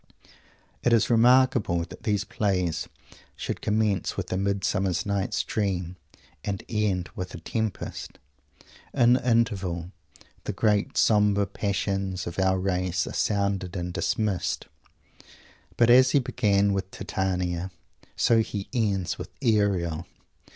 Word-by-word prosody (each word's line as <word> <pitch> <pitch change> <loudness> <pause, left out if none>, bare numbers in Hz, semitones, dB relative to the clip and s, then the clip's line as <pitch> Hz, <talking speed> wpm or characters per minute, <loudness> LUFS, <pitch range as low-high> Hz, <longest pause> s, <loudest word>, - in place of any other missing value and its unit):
It 120 - +2
is 115 +1 +3
remarkable 120 -6 +4
that 85 - -11
these 105 -2 0
plays 95 -6 -1 0.5
should - - -4
commence 105 -4 0
with - - -3
a - - 0
"Midsummer 100 0 0
Night's 100 -1 -1
Dream" 90 -4 -2 0.5
and 100 -2 -3
end 100 -5 -1
with 90 0 -5
a - - -7
"Tempest." 110 +2 -4 0.8
In 120 0 +5
the 125 0 +1
interval 95 -7 0 0.5
the - - -2
great 105 -2 +1
sombre 105 -2 +4
passions 95 -2 -2
of 85 +2 -5
our 95 0 +3
race 90 -1 0
are - - -6
sounded 100 -3 0
and 90 -1 -3
dismissed; 105 -3 -1 1.1
but 120 0 +5
as 130 +1 +7
he 140 - +4
began 105 -6 +2
with 95 -1 -2
Titania, 90 -2 -2 0.5
so 115 - +3
he 105 -3 -3
ends 100 -7 0
with - - -6
Ariel. 95 -7 +1
100 Hz, 125 wpm, -26 LUFS, 90-110 Hz, 1.1 s, as